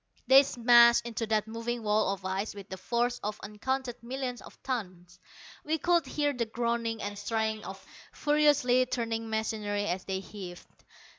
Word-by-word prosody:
They 265 +2 +8
smashed 240 -3 +5
into 230 -1 -3
that 215 -1 +1
moving 230 +1 -4
wall 210 -1 +2
of 195 -1 -6
ice 195 +3 -2
with 200 0 -10
the 190 - -6
force 240 +5 -1
of 210 0 -4
uncounted 245 +4 -3
millions 250 0 -4
of - - -14
tons. 180 -8 -5 0.4
We 315 +1 0
could 345 +1 +2
hear 290 -1 0
the 235 -3 -2
groaning 230 -1 -2
and 205 0 -4
straining 220 0 -1
of 190 0 -9 0.3
furiously 290 -4 +3
turning 230 -2 -2
machinery 215 -2 -1
as 180 -1 -2
they 190 -1 -2
heaved. 190 -2 -11
225 Hz, 160 wpm, -29 LUFS, 205-245 Hz, 0.4 s, They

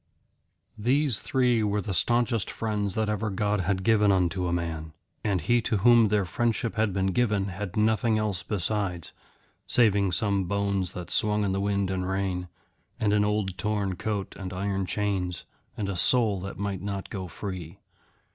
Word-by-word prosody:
These 130 +1 +3
three 125 -3 +2
were 105 -1 +1
the 100 0 -3
staunchest 120 +2 +1
friends 105 -3 -2
that 110 -1 0
ever 105 +1 -1
God 105 +1 0
had 95 +1 -1
given 105 -1 +4
unto 90 -1 +1
a - - -1
man. 80 -2 -3 0.3
And 100 -4 0
he 120 +9 +2
to 110 - 0
whom 115 +2 +6
their 105 -1 +1
friendship 115 +3 -1
had 110 -1 +1
been 95 0 0
given 105 -4 +1
had 95 +1 -5
nothing 110 +1 +2
else 105 -4 -1
besides, 95 -2 -2 0.6
saving 100 -5 +3
some 100 -3 +1
bones 100 -1 -1
that 90 -1 -6
swung 105 0 +2
in 100 - 0
the 95 +1 -1
wind 100 -1 0
and 95 0 -2
rain, 95 -2 -2 0.5
and 105 -2 +2
an 105 0 +3
old 105 -3 -1
torn 105 -3 -1
coat 100 0 -3
and 95 -1 -5
iron 95 0 -2
chains, 95 -4 -1 0.3
and 105 - -2
a 100 - -2
soul 110 +1 +3
that 95 +1 -6
might 100 -2 -3
not 100 0 -5
go 95 -2 -4
free. 90 -1 -7
100 Hz, 175 wpm, -27 LUFS, 95-110 Hz, 0.6 s, whom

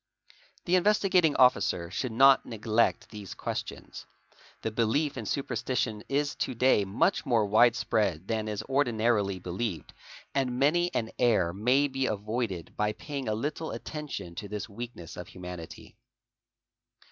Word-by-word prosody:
| - - -31
The. 185 +1 +4
Investigating 185 -4 +3
Officer 90 -9 +3
should 125 +5 -2
not 135 +4 +6
neglect 110 0 0
these 105 -3 -8
questions. - - -6 0.6
The 110 - -1
belief 120 +7 +1
in 115 -5 -5
superstition 120 -4 -2
is 145 +1 0
to 130 - -2
day 115 -4 +3
much 95 +2 +1
more 115 -4 +2
widespread 105 -5 +2
than 110 -1 -1
is 105 -2 -3
ordinarily 115 -7 +1
believed 90 -1 -4 0.4
and 130 -3 0
many 175 +6 +3
an 110 -1 -1
error 105 -9 +3
may 125 +8 +3
be 135 -1 -1
avoided 105 -3 -3
by 105 0 0
paying 140 +2 -6
a 110 - 0
little 150 +7 -3
attention 145 - -6
_ - - -21
to 105 - -5
this 105 +3 -5
weakness 110 -6 -8
of 90 - -7
humanity. 90 +4 -9
115 Hz, 145 wpm, -29 LUFS, 105-135 Hz, 0.6 s, not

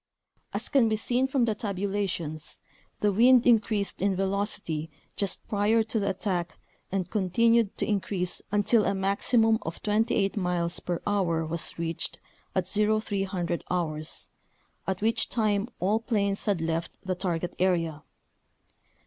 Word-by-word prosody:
As - - -2
can 255 -5 +4
be 220 - +2
seen 245 +4 +1
from 265 -3 +2
the 225 - +1
tabulations, 195 -6 -3 0.4
the 210 - +3
wind 240 +4 +6
increased 215 -5 +2
in 195 0 +2
velocity 195 -5 -2 0.3
just 200 -3 -1
prior 215 +2 +2
to 220 0 -1
the 200 -1 0
attack 180 -2 -2 0.3
and 190 -2 -1
continued 225 +2 +2
to - - +1
in 205 -2 +1
crease 180 -2 -3
until 210 +2 +4
a 200 - +1
maximum 220 +4 +2
of 160 - -6
28 210 -2 +1
miles 175 -2 -1
per 175 -2 -3
hour 175 -6 +1
was 160 0 -1
reached 165 -1 -3 0.4
at 185 -2 +1
0300 200 -4 0
hours, 155 -3 -2 0.6
at 190 0 -2
which 225 +2 +1
time 215 -1 +1
all 205 +5 +2
planes 200 -4 0
had 200 -5 +1
left 165 +1 -2
the 185 - 0
target 175 -1 -2
area. 165 -4 +1
200 Hz, 140 wpm, -27 LUFS, 175-215 Hz, 0.6 s, wind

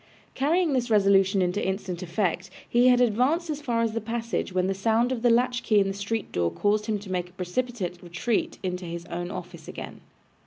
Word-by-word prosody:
Carrying 315 +3 +2
this 250 -2 0
resolution 195 -2 +4
into 180 +3 -1
instant 190 -2 -3
effect, 185 0 -1 0.2
he 240 +1 +4
had 250 -1 +6
advanced 260 +9 +2
as 300 0 -4
far 235 -5 0
as 225 - +1
the 230 +1 -3
passage, 230 -1 -3
when 185 0 +1
the 195 - +1
sound 225 +5 +1
of 250 -3 -2
the 240 - +4
latch 245 +1 +2
key 215 -2 +3
in 195 - +2
the 195 - -2
street 205 +2 -3
door 85 -1 +1
caused 210 - 0
him 215 -2 0
to 200 -2 -9
make 180 -1 -2
a - - -23
precipitate 185 -1 -3
retreat 180 +6 -1
into 180 -1 -3
his 170 0 -6
own 175 +1 -3
office 175 -3 -8
again. - - -8
205 Hz, 210 wpm, -26 LUFS, 180-240 Hz, 0.2 s, had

